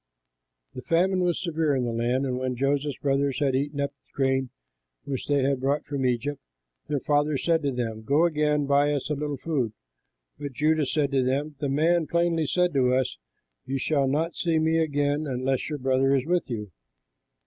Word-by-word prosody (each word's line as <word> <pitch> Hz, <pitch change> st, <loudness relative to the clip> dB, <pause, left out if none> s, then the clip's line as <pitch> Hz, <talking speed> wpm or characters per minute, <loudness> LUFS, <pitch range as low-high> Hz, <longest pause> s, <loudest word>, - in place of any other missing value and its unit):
The 125 Hz, -, -7 dB
famine 185 Hz, +6 st, +2 dB
was 175 Hz, -2 st, +1 dB
severe 160 Hz, -4 st, 0 dB
in 130 Hz, -, 0 dB
the 120 Hz, -, -1 dB
land; 120 Hz, +4 st, 0 dB
and 125 Hz, -1 st, -2 dB
when 130 Hz, -1 st, -2 dB
Joseph's 140 Hz, +2 st, 0 dB
brothers 140 Hz, -1 st, 0 dB
had 135 Hz, -2 st, +1 dB
eaten 140 Hz, +2 st, -2 dB
up 140 Hz, 0 st, -1 dB
the 140 Hz, -, -41 dB
grain 135 Hz, -1 st, +1 dB, 0.5 s
which 135 Hz, -2 st, -4 dB
they 145 Hz, -2 st, +2 dB
had 135 Hz, 0 st, +1 dB
brought 140 Hz, +3 st, 0 dB
from 135 Hz, -3 st, -1 dB
Egypt, 130 Hz, +4 st, -2 dB, 0.5 s
their 145 Hz, -3 st, -1 dB
father 145 Hz, 0 st, +1 dB
said 165 Hz, +3 st, +1 dB
to 140 Hz, -2 st, 0 dB
them, 115 Hz, -3 st, -3 dB
"Go 145 Hz, +9 st, +3 dB
again, 150 Hz, -3 st, +1 dB
buy 140 Hz, +1 st, +3 dB
us 145 Hz, +1 st, -2 dB
a -, -, +3 dB
little 145 Hz, 0 st, -3 dB
food." 130 Hz, -7 st, -1 dB, 0.7 s
But 145 Hz, -2 st, -5 dB
Judah 155 Hz, +1 st, +2 dB
said 145 Hz, 0 st, 0 dB
to 135 Hz, -2 st, +2 dB
him, 140 Hz, +4 st, -1 dB
"The 145 Hz, -, -1 dB
man 160 Hz, +3 st, +2 dB
plainly 170 Hz, -2 st, +1 dB
said 180 Hz, +4 st, +1 dB
to 130 Hz, -2 st, +3 dB
us: 130 Hz, -1 st, -1 dB, 0.5 s
'You 135 Hz, +1 st, -1 dB
shall 140 Hz, 0 st, +1 dB
not 160 Hz, +5 st, 0 dB
see 165 Hz, -2 st, +1 dB
me 160 Hz, +1 st, +2 dB
again 145 Hz, -1 st, 0 dB
unless 130 Hz, +1 st, -1 dB
your 150 Hz, -, -3 dB
brother 135 Hz, +1 st, +2 dB
is 130 Hz, -1 st, 0 dB
with 175 Hz, -1 st, 0 dB
you.' 105 Hz, -5 st, -5 dB
140 Hz, 195 wpm, -26 LUFS, 130-155 Hz, 0.7 s, Go